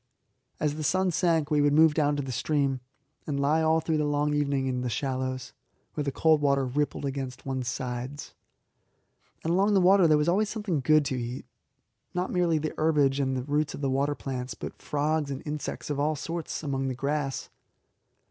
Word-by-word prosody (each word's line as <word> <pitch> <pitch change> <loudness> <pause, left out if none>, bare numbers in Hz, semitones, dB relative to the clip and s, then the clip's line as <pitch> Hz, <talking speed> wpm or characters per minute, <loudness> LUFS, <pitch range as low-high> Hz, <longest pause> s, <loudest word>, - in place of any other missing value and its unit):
As 150 0 0
the 155 - -3
sun 185 +3 +2
sank 165 -3 +1
we 150 -1 +4
would 145 0 +3
move 160 0 +6
down 150 -1 +2
to 145 - -2
the 130 - -5
stream, 140 +1 0 0.5
and 140 -2 -1
lie 150 +3 +2
all 160 0 +3
through 160 -1 0
the - - +1
long 145 0 +1
evening 140 -2 0
in 125 -1 -1
the 125 - -2
shallows, 130 +1 -3 0.4
where 150 - -2
the 140 - -1
cold 155 +2 +3
water 140 -2 +2
rippled 145 +3 -1
against 135 -2 -4
one's 130 -2 -3
sides. 125 +2 -4 1.1
And 165 - 0
along 200 +3 +3
the - - +6
water 185 -1 +6
there 155 -1 +5
was 150 +1 +1
always 200 +5 +2
something 210 -8 -2
good 155 +3 +4
to 130 -2 -1
eat 120 +2 -5 0.7
not 180 +1 -1
merely 175 -3 +2
the 155 0 -2
herbage 145 -3 +3
and 130 -1 0
the 125 - -3
roots 145 +2 -1
of - - -8
the 135 -2 0
water 140 +2 +1
plants, 125 -4 -5
but - - -8
frogs 150 0 0
and 135 -1 -5
insects 150 0 -4
of 145 - -2
all 155 +2 +1
sorts 165 +3 -4
among 135 -2 -1
the 130 - -2
grass. 140 +1 -2
145 Hz, 200 wpm, -27 LUFS, 135-155 Hz, 1.1 s, move